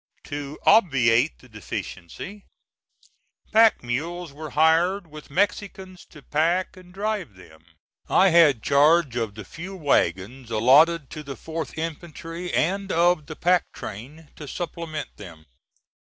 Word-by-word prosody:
To 145 0 -6
obviate 135 - +4
the 130 - -19
deficiency, 110 - -8 1.1
pack 220 - +5
mules 160 +6 -4
were 155 +1 -8
hired, 165 +6 +2
with 155 -1 -13
Mexicans 190 +1 -2
to 150 -3 -15
pack 170 +6 0
and 185 -1 -15
drive 200 - -3
them. 80 -3 -17 0.5
I 195 - +5
had 160 -9 +5
charge 145 -1 +3
of 115 -4 -3
the 110 -2 -9
few 185 - -9
wagons 120 - 0
allotted 140 +8 +4
to 155 - -7
the 140 -2 -8
4th 160 +3 -6
infantry 165 +2 -6
and 195 +3 0
of 170 -2 +2
the 155 - -7
pack 180 +2 +1
train 145 +10 -9
to 150 - -9
supplement 165 -1 -6
them. 85 -6 -12
155 Hz, 130 wpm, -24 LUFS, 135-175 Hz, 1.1 s, pack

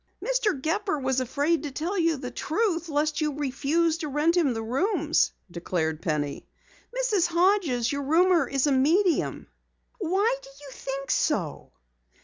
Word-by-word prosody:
"Mr. - - +1
Gepper 320 +4 -1
was 265 -1 0
afraid 285 +5 0
to 295 - -4
tell 320 +8 -3
you 330 -4 +2
the 250 -2 -6
truth 340 - -1
lest 300 +1 0
you 300 -2 0
refuse 300 +4 0
to 310 - -3
rent 295 +4 +2
the 270 -11 +1
rooms," 315 - +1 0.2
declared 165 -2 -2
Penny. 150 -3 -2 0.6
"Mrs. 415 -9 +2
Hodges, 340 - +2
your 285 0 -2
roomer 335 +5 +3
is 275 0 0
a 290 - +2
medium." 325 +8 +2 0.5
"Why 400 +6 +1
do - - -13
you 290 -1 -11
think 275 +1 -5
so?" 175 - -1
305 Hz, 145 wpm, -26 LUFS, 265-345 Hz, 0.6 s, roomer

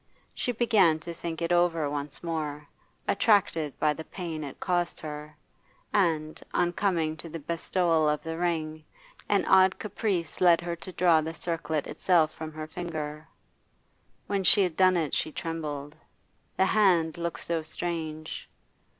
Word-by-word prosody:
She 245 - -1
began 215 -9 +4
to 170 +2 -6
think 170 0 -5
it 170 - -1
over 175 -3 +3
once 145 +1 -4
more, 150 -3 -3 0.4
attracted 165 - +2
by 150 -1 +2
the 160 - -7
pain 165 -3 -5
it 140 - -8
caused 175 -1 0
her, 150 0 -7 0.6
and, 160 -6 +1
on 175 0 +2
coming 170 -5 0
to 165 - -8
the 165 - -5
bestowal 165 0 +1
of 150 0 -1
the 160 0 -4
ring, 160 -2 -2 0.5
an 200 -1 +3
odd 190 0 +5
caprice 195 -5 -2
led 175 -2 +6
her 170 0 -3
to 180 +2 -9
draw 170 -3 +4
the 160 +1 -5
circlet 160 -3 -2
itself 165 -4 +2
from 160 0 -7
her 155 0 -5
finger. 155 -2 -5 1.0
When 200 -1 -1
she 200 +2 +6
had 180 -4 -1
done 185 -1 +5
it 155 -4 -1
she 155 - 0
trembled. 150 -3 -5 0.6
The 190 - +4
hand 175 -6 +3
looked 170 0 -3
so 170 -1 -1
strange. 155 -1 -5
165 Hz, 155 wpm, -28 LUFS, 155-175 Hz, 1.0 s, led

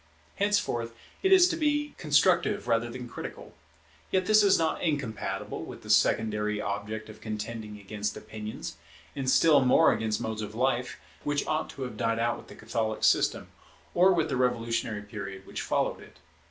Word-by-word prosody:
Henceforth 195 - 0 0.3
it 385 - +2
is 370 -2 +8
to 335 - -1
be 295 -2 0
constructive 175 +6 +2
rather 115 0 +1
than 125 +1 -7
critical; - - -8 0.6
yet 185 -1 +1
this 215 +1 +6
is 200 -2 +5
not 160 -1 0
incompatible 140 - -2
with - - -9
the - - -2
secondary 105 -1 +2
object 105 +2 -4
of 110 0 -12
contending 110 0 -5
against 105 +1 -4
opinions, 110 0 -7 0.4
and 135 -2 -1
still 150 +1 +6
more 125 - +5
against 110 -1 -1
modes 110 -1 -3
of 105 0 -6
life, 125 0 0 0.2
which 145 -1 0
ought 155 +1 -1
to 135 - -6
have 125 -4 -6
died 115 +1 0
out 120 +1 0
with - - -14
the - - -12
Catholic 110 -1 -3
system, - - +2 0.4
or 185 +2 +5
with 165 -4 +2
the - - -1
revolutionary 115 -4 0
period 100 -2 -7
which - - -5
followed - - 0
it. - - -16
120 Hz, 170 wpm, -28 LUFS, 110-160 Hz, 0.6 s, is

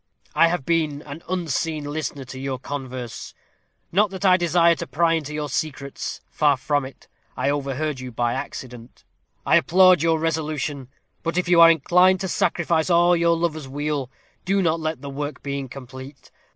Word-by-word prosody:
I 165 +2 +5
have 165 -5 -2
been 155 -3 0
an 145 +2 -9
unseen 165 -3 -2
listener 145 -1 -4
to 130 0 -9
your 135 -1 -3
converse; 130 -3 -7 0.6
not 205 +4 +3
that 190 +1 -5
I 185 -1 +7
desire 170 -1 +3
to - - -5
pry 165 +4 +2
into 155 -3 -2
your 150 -1 -3
secrets 140 -1 -4
far 145 -3 +3
from 145 +1 0
it; 130 -1 -13 0.3
I 140 - +1
overheard 145 0 -2
you 130 -1 -7
by 120 +1 -1
accident. 125 -2 -8 0.4
I - - +5
applaud 185 -2 +5
your 165 0 +2
resolution; 155 -4 -2 0.3
but 165 +1 -3
if 180 - 0
you 175 -1 +5
are 165 - +10
inclined 180 +4 +4
to 190 - -2
sacrifice 170 -1 0
all 175 0 +4
for - - +3
your 170 0 +2
lover's 155 -4 -2
weal, 145 -1 -3 0.3
do 195 +2 +1
not 165 -1 +1
let 155 0 -3
the 140 - -5
work 145 +2 -5
be 140 0 -3
incomplete. 130 +1 -10
155 Hz, 180 wpm, -23 LUFS, 135-170 Hz, 0.6 s, are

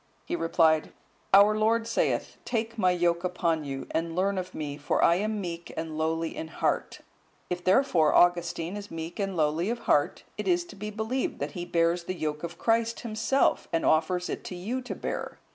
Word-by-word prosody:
He 345 - -2
replied, 160 - +2 0.4
"Our 205 +2 +7
Lord 225 +1 +2
saith, 230 - -1
Take 230 -1 -2
My 185 -5 +3
yoke 175 -1 +1
upon 170 -3 0
you, 135 -1 -5
and 165 0 -2
learn 190 +1 +1
of 185 0 -7
Me, 145 -2 -4
for 145 0 0
I 170 - +6
am 215 +2 -1
meek 170 -2 -5
and 160 -1 -4
lowly 160 +1 -1
in 160 - -5
heart; 160 - -2 0.5
if 180 0 -2
therefore, 185 - +3
Augustine 175 0 +2
is 205 -1 -7
meek 165 +3 -6
and 195 -2 -2
lowly 160 +5 +1
of 235 0 -2
heart, - - +1 0.2
it - - -3
is 350 -1 +2
to 350 - -12
be 210 +2 -5
believed 220 +5 -2
that - - -3
he 175 -3 -5
bears 170 0 +1
the 185 - -3
yoke 150 -2 -3
of 170 0 -5
Christ 230 0 +1
himself, 230 +4 +1
and 165 - 0
offers 180 +3 +2
it - - -4
to 180 - -6
you 225 +9 -3
to 250 - -6
bear. - - -4
180 Hz, 195 wpm, -28 LUFS, 165-215 Hz, 0.5 s, Our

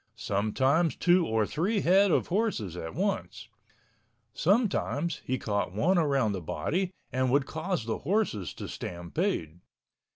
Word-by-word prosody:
Sometimes 130 - +1
two 175 -1 +3
or 110 -1 +1
three 195 - 0
head 195 +3 +5
of - - +1
horses 175 - -1
at 80 -2 -6
once. - - -2 0.8
Sometimes 180 - +1
he 130 - 0
caught 100 -6 -2
one 175 - +2
around 135 -8 +2
the 95 -2 -3
body 170 - -1 0.2
and 130 0 +1
would 140 +1 +3
cause 160 - -3
the 115 - -2
horses 185 - -1
to - - -6
stampede. 85 -1 -3
140 Hz, 135 wpm, -29 LUFS, -, 0.8 s, head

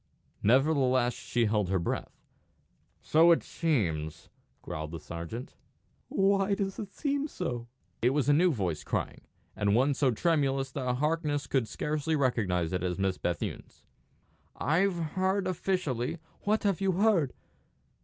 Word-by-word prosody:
Nevertheless 130 0 +3
she 120 -1 -1
held 105 -3 +1
her 95 - +2
breath. 85 - -4 0.8
"So 165 +2 +5
it 165 - +4
seems," 85 - -1 0.3
growled 80 0 -5
the 85 +1 -6
sergeant. 85 +11 -7 0.5
"Why 195 0 +2
does 195 -1 -3
it 205 -3 -6
seem 285 0 -1
so?" 125 - -4 0.3
It 120 - +4
was 140 0 +1
a 145 - +5
new 175 +4 +4
voice 95 - -2
crying, - - -3 0.3
and 100 0 +2
one 135 +4 +3
so 135 -1 +2
tremulous 135 0 +1
that 125 -4 -1
Harkness 150 0 0
could 130 -5 0
scarcely 155 +6 -1
recognise 100 - +1
it 90 - 0
as 90 -1 -1
Miss 95 -1 0
Bethune's. 90 -2 -4 0.7
"I've 180 +5 +2
heard 185 +4 0
officially 170 -8 -1
" - - -33
"What 215 +2 +2
have 200 -2 +1
you 190 -1 +2
heard?" 185 - +3
140 Hz, 145 wpm, -29 LUFS, 110-175 Hz, 0.8 s, So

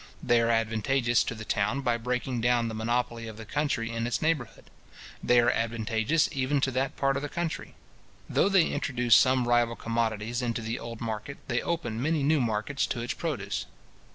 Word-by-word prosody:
They 120 -1 +4
are 115 - +1
advantageous 115 +2 +2
to 115 - -3
the 110 0 -8
town 105 +7 0
by 120 -3 +1
breaking 125 +1 -2
down 120 -1 +2
the - - -5
monopoly 115 +1 -1
of 110 -1 -8
the 110 - -8
country 115 -3 -1
in 115 0 -2
its 120 - -1
neighbourhood. 155 -7 -2 0.5
They 125 0 +5
are 120 0 +4
advantageous 115 +5 +1
even 140 0 0
to 135 - +1
that 130 +2 -1
part 135 0 +1
of - - -3
the 145 - -4
country. 170 0 -4 0.5
Though 195 - +2
they 195 -4 +5
introduce 125 -3 +1
some 130 -1 +4
rival 120 -1 +3
commodities 115 0 -1
into 120 -2 -2
the 115 +2 -3
old 115 0 -8
market, 115 +4 -4
they 125 -1 0
open 150 -10 -2
many 155 +1 +1
new 150 0 +3
markets 115 +4 -1
to 120 - -3
its 120 - -2
produce. 125 - -3
120 Hz, 190 wpm, -28 LUFS, 115-135 Hz, 0.5 s, They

